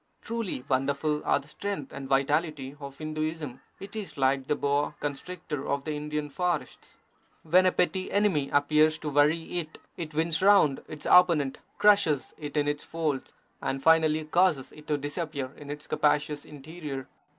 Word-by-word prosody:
Truly 225 - -3
wonderful 140 +3 0
are - - +4
the 140 0 -9
strength 150 -3 -5
and 135 -1 -7
vitality 140 0 0
of 140 -1 -9
Hinduism. 155 -3 -4 0.2
It 200 +2 -9
is 210 -7 -5
like 135 0 +1
the 150 - +2
boa 145 +1 0
constrictor 150 0 -5
of 140 0 -1
the 155 - -3
Indian 150 0 -3
forests. 175 0 -3 0.5
When 180 +3 +5
a - - +4
petty 185 +1 0
enemy 190 -9 +2
appears 155 +2 +3
to 155 - -4
worry 155 +4 +2
it, 155 -2 -7 0.2
it 160 -3 -6
winds 160 +1 +1
round 195 -8 +5
its 150 - -8
opponent, 170 -7 +5 0.2
crushes 200 -9 +3
it 150 -1 -5
in 145 0 +2
its 145 0 -1
folds, 155 -5 -3 0.3
and 135 0 -2
finally 160 -1 +4
causes 155 -4 +2
it 150 0 -15
to 150 - +1
disappear 145 -2 -4
in 145 -1 -11
its 150 +1 -6
capacious 150 0 +1
interior. 150 -2 -7
150 Hz, 160 wpm, -28 LUFS, 140-165 Hz, 0.5 s, When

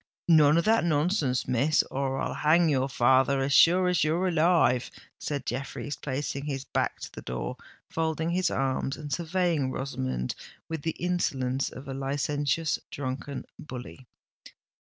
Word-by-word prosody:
"None 155 -2 +6
of 170 - +2
that 225 +1 +4
nonsense, 150 -4 +1
Miss—or 135 +1 +1
I'll - - -2
hang 160 +2 +3
your 135 -2 +1
father, 130 +2 +3
as 135 +1 0
sure 180 +4 +6
as 180 -1 +2
you're 165 +5 +1
alive!" 165 -7 +3 0.3
said 140 -3 -3
Jeffreys, 135 +2 -4
placing 140 +1 -4
his 135 -2 -4
back - - -1
to - - -7
the - - -8
door, 60 +1 -4 0.3
folding 160 0 -1
his 180 0 +1
arms, 135 +1 -1
and 145 -2 -5
surveying 170 -3 0
Rosamond 65 - -3 0.3
with 160 -2 -4
the 160 +1 -2
insolence 135 -7 -1
of 130 +2 -10
a 135 - -4
licentious, 145 +3 -1
drunken 135 0 -5
bully. 130 -2 -9
145 Hz, 145 wpm, -28 LUFS, 130-165 Hz, 0.3 s, None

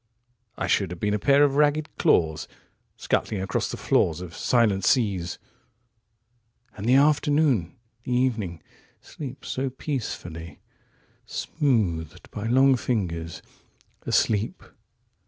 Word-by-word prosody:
...73I - - -2
should 100 -3 +2
have 90 -1 -7
been 105 +2 0
a 105 - 0
pair 140 +5 +4
of 140 -1 +2
ragged 150 +1 +3
claws74Scuttling 80 +4 -1
across 95 - -1
the - - -5
floors 80 0 +1
of 90 -1 -8
silent 110 -6 +2
seas. 100 -9 +1 1.4
*75And 105 - -6
the 125 - +5
afternoon, 145 - +3 0.3
the 125 - -6
evening, 110 - -1 0.4
sleeps 135 -3 -9
so 135 +1 -1
peacefully!76Smoothed 85 - -4
by 105 +1 -4
long 130 +3 +5
fingers,77Asleep 100 +1 -3
110 Hz, 100 wpm, -25 LUFS, 85-135 Hz, 1.4 s, the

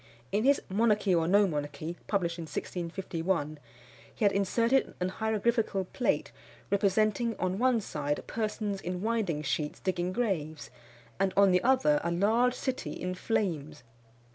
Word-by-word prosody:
In 210 +4 +1
his 280 +1 +5
Monarchy 210 -1 +2
or 165 -1 +2
no 200 +3 +5
Monarchy, 150 0 -4
published 175 -4 -1
in 165 - -4
1651, 170 -3 -3 0.6
he 215 - 0
had 200 - +5
inserted 230 +7 +1
an 180 0 0
hieroglyphical 220 -1 0
plate 250 - 0 0.4
representing 215 +3 +2
on 185 +1 -1
one 250 -1 +3
side 145 -7 -3
persons 210 -3 -3
in 180 +1 -4
winding 215 -10 0
sheets 150 +1 -2
digging 180 -1 -1
graves; 175 -9 -2 0.5
and 195 -1 +1
on 200 -1 +6
the 180 0 +3
other 250 - +3
a 170 - 0
large 220 +8 +2
city 260 -1 -3
in 180 0 -4
flames. 155 - -2
195 Hz, 140 wpm, -30 LUFS, 170-220 Hz, 0.6 s, on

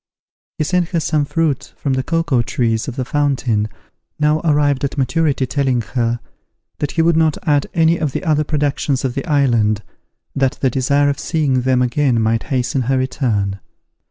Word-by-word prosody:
He - - 0
sent 175 +2 0
her 170 - 0
some 155 -2 0
fruit 160 -1 -1
from 140 - -1
the 130 - +1
cocoa 165 -3 +1
trees 115 -1 -1
of 130 - -5
the 130 -2 -2
fountain, 130 -7 0 0.5
now 150 +1 +2
arrived 145 -4 +2
at 140 +1 -2
maturity 140 0 +1
telling 130 -1 0
her, 120 -2 0 0.6
that 145 - -2
he 165 - +2
would 170 0 +3
not 160 -2 +2
add 145 -2 +2
any 165 0 +3
of 155 -4 -1
the - - -4
other 155 -3 +2
productions 145 -2 -1
of 130 - -1
the 140 - -4
island, 120 - +2 0.5
that 135 +1 +1
the 130 - +1
desire 140 +3 +2
of 140 - -2
seeing 145 -6 0
them 125 0 +2
again 125 -1 +1
might 110 0 +1
hasten 130 0 0
her 135 - +3
return. 115 -7 -1
140 Hz, 180 wpm, -18 LUFS, 125-150 Hz, 0.6 s, would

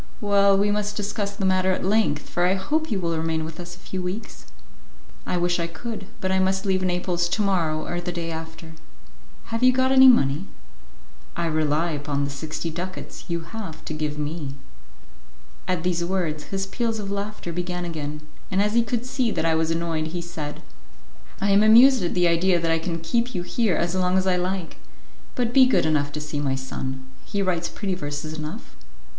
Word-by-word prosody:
"Well, 200 -1 +4
we 205 +1 +2
must 210 0 -1
discuss 205 -1 -2
the 200 -1 -2
matter 185 0 +3
at 185 - -2
length, 205 -7 +2
for 175 0 +1
I 185 - +3
hope 310 +12 -1
you 210 -5 0
will 170 -2 -1
remain 160 0 -1
with 160 +1 -8
us 175 0 -7
a - - -18
few 185 +1 -5
weeks." 185 - -6 0.8
"I 180 - 0
wish 175 0 +1
I 170 - 0
could, 200 +4 -6
but 185 - -1
I 190 - +3
must 190 +1 +1
leave 190 -1 +2
Naples 180 -1 0
to 215 - +1
morrow 165 -6 +1
or 175 0 -3
the 175 0 -3
day 170 -1 -4
after." 160 0 -7 0.8
"Have 230 - -1
you 255 0 +7
got 260 +1 +2
any 265 0 +8
money?" 155 - +4 0.9
"I 170 - -1
rely 155 +1 +1
upon 145 -1 -2
the 140 - -2
sixty 160 +3 -4
ducats 180 +3 -6
you 170 -1 -2
have 165 -1 -8
to - - -4
give 150 -1 -2
me." 150 -2 -4 1.1
At 180 -3 0
these 175 -1 0
words, 170 -4 -1
his 195 0 -2
peals 230 +2 -2
of 200 -2 -4
laughter 200 -3 -4
began 180 +1 -3
again, 150 -3 -5 0.3
and 190 - 0
as 210 +1 +2
he 235 - +5
could 235 +1 -2
see 255 -2 0
that 190 - -1
I 165 - +3
was 160 0 +1
annoyed, 165 -1 -1
he 175 +2 -4
said, 155 -4 -6 0.8
"I 200 - +2
am 200 +1 +6
amused 240 +4 +7
at 175 - -1
the 180 -1 +4
idea 170 +1 +3
that 165 -1 0
I 165 - +2
can 165 0 -3
keep 235 +8 0
you 175 - -1
here 210 +1 +1
as 170 +1 0
long 185 0 +2
as 190 - +2
I 185 -1 +3
like. 180 -1 -2 0.6
But 240 -1 0
be 260 -1 +7
good 255 - +3
enough 145 -2 +1
to 150 - -3
see 150 -1 -4
my 135 -2 0
son; 130 0 -5 0.2
he 200 -1 -2
writes 175 -3 0
pretty 195 -3 -3
verses 150 -2 -4
enough." 155 +7 -7
180 Hz, 205 wpm, -24 LUFS, 160-200 Hz, 1.1 s, any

